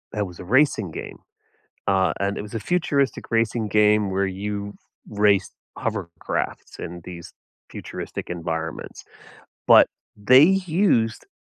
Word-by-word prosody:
It 105 - 0
was 90 - -12
a - - -7
racing 110 - +2
game, - - -8 0.7
uh, 95 -1 +2
and 100 0 -1
it - - -3
was 105 +2 -10
a 115 - -2
futuristic 140 -5 -1
racing 115 -1 0
game 105 -1 +3
where 95 +1 +1
you 100 +1 -4 0.4
race 105 -1 +2 0.3
hovercrafts 95 -7 -4
in 85 0 -7
these 85 -2 -10 0.4
futuristic - - -7
environments, 80 -2 -5 0.6
but - - +8 0.3
they 130 +7 +6
used 180 - +2
105 Hz, 125 wpm, -23 LUFS, 95-115 Hz, 0.7 s, but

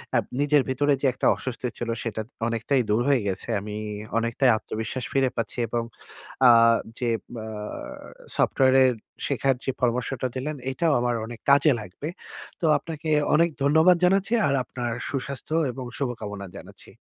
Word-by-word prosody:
আ - - +5 0.2
নিজের 145 0 +4
ভিতরে 145 +2 +2
যে - - 0
একটা - - 0
অস্বস্তি 125 -1 -4
ছিল, 120 - -4
সেটা 110 -1 -3 0.3
অনেকটাই 120 +3 +1
দূর 105 +3 +3
হয়ে 135 -5 +3
গেছে। 95 +4 -3
আমি 105 0 -6 0.4
অনেকটাই 115 +3 +2
আত্মবিশ্বাস 110 +4 -5
ফিরে 135 -2 +3
পাচ্ছি 115 +1 -3
এবং 115 +1 -1 0.7
আ - - +10 0.5
যে 120 -2 0 0.3
বা 110 - -6 0.9
সফটওয়্যারের 130 -1 +4 0.3
শেখার 135 -1 +1
যে 135 - +1
পরামর্শটা 125 +1 0
দিলেন, 145 +4 -3 0.2
এটাও 155 +4 +1
আমার 120 -1 +1
অনেক 120 0 -9
কাজে 140 +2 +6
লাগবে। 105 +10 -8 0.5
তো - - -1
আপনাকে 160 -1 -6 0.3
অনেক 170 +2 +4
ধন্যবাদ 160 +5 +5
জানাচ্ছি 195 +4 +2
আর 140 - +1
আপনার 120 -1 -4 0.2
সুস্বাস্থ্য 140 +3 -4 0.2
এবং 130 0 -7
শুভকামনা 105 -7 -4
জানাচ্ছি। - - -13
130 Hz, 145 wpm, -25 LUFS, 115-145 Hz, 0.9 s, আ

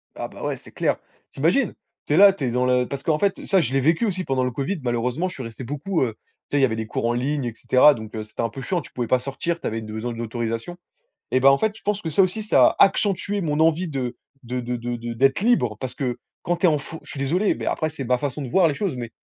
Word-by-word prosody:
Ah - - -4
bah, - - -11
ouais, - - -2
c'est - - -16
clair. - - 0 0.3
Tu - - -13
imagines, 185 - +2 0.3
tu 145 - -1
es - - +4
là, 200 0 +8
tu 170 - -7
es 125 - 0
dans 125 +1 +1
le 125 0 +3
parce 140 -1 -5
qu'en 155 -2 +2
fait 200 -1 0
ça, 195 -3 +3
je 130 -5 -2
l'ai 135 - +3
vécu 160 - +2
aussi 185 -3 -1
pendant 130 -1 0
le 125 - 0
Covid, 140 +9 -2
malheureusement 125 +8 0
je - - -9
suis 130 - -6
resté 115 +2 -8
beaucoup, 150 +8 -2
heu, 115 -3 -2 0.3
tu 145 - 0
sais, - - +4
il - - +2
y - - +7
avait 115 -4 -1
des 110 -1 -4
cours 110 - -2
en 120 - +2
ligne 135 +2 -1
et 120 - -3
cetera, 130 +5 +5
donc 110 -3 -9
heu, 110 - -3
c'était 110 0 -6
un 115 - 0
peu 135 - -8
chiant, 175 +5 -1
tu - - -14
pouvais 120 -2 -3
pas 130 - +3
sortir, 150 +6 -3
tu - - -3
avais 115 +1 -3
besoin 110 +2 -5
d'autorisation. 115 +6 -4 0.5
Et 130 - +2
ben, 135 - +6
en 135 - +4
fait, 220 -1 +1
je - - -16
pense 205 0 -1
que 165 - -4
ça 175 +6 +4
aussi, 185 +4 0
ça 215 - +5
a - - -3
accentué 200 0 0
mon 150 -3 -1
envie 165 +3 +3
de 130 -5 -3 0.3
de 125 +1 -3
de 125 0 -3
de 120 +1 -4
de 120 0 -5
d'être 135 +7 +2
libre 200 - +2
parce 130 0 -5
que 125 -3 -2 0.2
quand 175 0 0
tu 180 - +3
es - - +6
en 150 - +2
fo 160 +3 -8
je - - -14
suis 140 - -7
désolé, 180 +10 +1
mais - - -6
après 155 - 0
c'est 140 -3 -6
ma 125 +1 +1
façon 145 +1 -3
de 130 - -5
voir 185 +6 +4
les 145 - -1
choses, 185 -5 -2
mais 120 -2 -5
135 Hz, 300 wpm, -23 LUFS, 120-170 Hz, 0.5 s, là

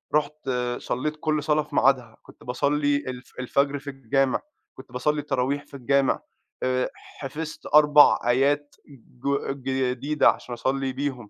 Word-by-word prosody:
رُحت 150 -2 -1 0.3
صلّيت 150 +5 -2
كل 155 -2 0
صلاة 150 0 +2
في - - -11
ميعادها. 125 -5 +2
كنت - - -17
باصلّي 145 +3 +1
الف 125 0 -7
الفجر 140 +2 0
في 140 0 -8
الجامع، 135 0 0 0.3
كنت 130 -1 -14
باصلّي 150 +4 0
التراويح 140 +1 -1
في - - -27
الجامع، 140 +1 +1 0.4
آآ 130 0 +1
حفظت 150 +3 -8
4 150 -1 +7
آيات 140 +4 +1 0.5
ج 140 - +1 0.6
جديدة 145 +4 +2
عشان 120 - -3
أصلّي 130 +2 -1
بيهم. 130 -5 -4
140 Hz, 140 wpm, -25 LUFS, 130-145 Hz, 0.6 s, 4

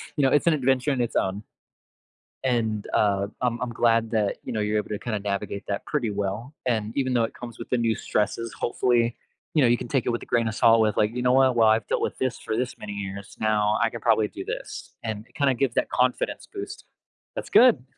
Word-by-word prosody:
you 145 - +1
know, 135 - +5
it's 145 - +3
an 170 - +6
adventure 135 -1 +1
in 130 -3 0
its 120 - -2
own. 95 +2 0 1.0
And, 110 -5 0
uh, 100 -1 +2
I'm 120 -1 0
I'm 125 - -2
glad 115 -1 +2
that, 105 -3 0
you - - -5
know, 110 - -1
you're 105 +1 0
able 105 - -2
to, 105 - -3
kinda 110 -4 -3
navigate 100 0 -3
that 100 -1 -3
pretty 130 -7 -1
well, 105 +6 -3
and 110 -3 -1
even 130 -2 +1
though 120 -2 +3
it 115 - -3
comes 120 -1 -9
with 115 - -8
the 125 - +2
new 115 -1 +1
stresses, 110 +2 -1
hopefully, 120 -1 +1 0.4
you 155 - +3
know, 125 - +5
you 120 - +4
can 120 - -6
take 135 -2 0
it - - 0
with 120 - -2
a - - -10
grain 115 -2 +1
of 110 - -3
salt 115 -1 +5
with, 110 -1 +1
like, 105 +1 +3
"You 125 - -1
know 125 0 +3
what? 130 -2 +4
Well, 115 -2 +5
I've 110 -1 +2
dealt - - 0
with - - -2
'this' 130 -2 -1
for 110 - -3
'this' 125 0 -2
many 105 -1 -7
years, 100 0 -6
now 105 -1 +2
I 115 - +3
can 120 0 -8
probably 110 -2 +3
do - - -8
this." - - -6
And 110 -1 -4
it, - - -29
kinda 140 -3 +2
gives 135 +1 0
that - - +1
confidence 125 0 0
boost 400 +1 -7 0.5
that's - - -5
good! 235 - +6
115 Hz, 245 wpm, -25 LUFS, 105-125 Hz, 1.0 s, an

